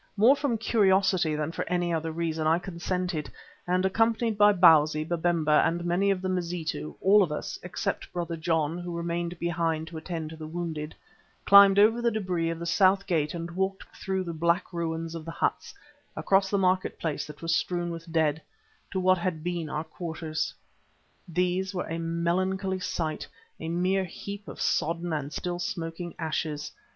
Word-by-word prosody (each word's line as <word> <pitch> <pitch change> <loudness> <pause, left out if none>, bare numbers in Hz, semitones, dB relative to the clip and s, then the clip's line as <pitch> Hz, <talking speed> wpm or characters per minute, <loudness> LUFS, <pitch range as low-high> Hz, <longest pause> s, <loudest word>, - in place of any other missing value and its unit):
More 235 +7 +6
from 275 -5 -1
curiosity 190 -6 +2
than 150 +1 -2
for - - -3
any 175 -1 0
other 160 0 -1
reason 160 -1 -1
I 160 +1 +4
consented 180 -2 -3 0.4
and 180 +1 +1
accompanied 225 +3 +2
by 205 0 +6
Bausi, 155 -4 +5
Babemba 165 -3 +2
and 170 +1 0
many 180 +3 +2
of 190 -1 0
the - - 0
Mazitu, 170 - -3
all 205 +2 +6
of 175 -6 +1
us, 150 - -4
except - - -4
Brother 170 -1 -3
John, 160 0 0
who 175 -1 -5
remained 170 0 -3
behind 165 -2 -1
to 165 - -8
attend 160 -1 -5
to - - -8
the 155 -1 -8
wounded, 160 -2 -5 0.5
climbed 200 0 +8
over 220 +3 +5
the 235 - +3
debris 185 -6 -1
of 165 - -3
the 170 - -6
south 195 +2 +3
gate 155 -2 0
and 170 0 -5
walked 190 +2 -2
through 190 -1 -2
the 170 -2 -5
black 170 +4 0
ruins 165 -1 -3
of 165 -1 -6
the 165 - -8
huts, - - -2 0.4
across 195 0 +2
the 200 - +1
market 185 -1 +1
place 155 -3 -3
that 150 +1 -11
was 165 0 +1
strewn 175 -1 -1
with 165 0 -8
dead, 160 -1 +1 0.5
to 190 - -2
what 185 0 +3
had 170 -3 -2
been 175 -3 -3
our 150 +1 -2
own 160 - -32
quarters. 160 -2 -3 0.8
These 180 +2 -1
were 180 - -2
a 165 +1 -3
melancholy 185 +3 -1
sight, 165 -4 -3 0.3
a 160 - -5
mere 185 +3 +1
heap 200 +3 -8
of - - -9
sodden 170 +1 0
and 145 -2 -3
still 175 +3 -3
smoking 175 -3 -4
ashes. 155 -2 -3
170 Hz, 180 wpm, -27 LUFS, 160-185 Hz, 0.8 s, climbed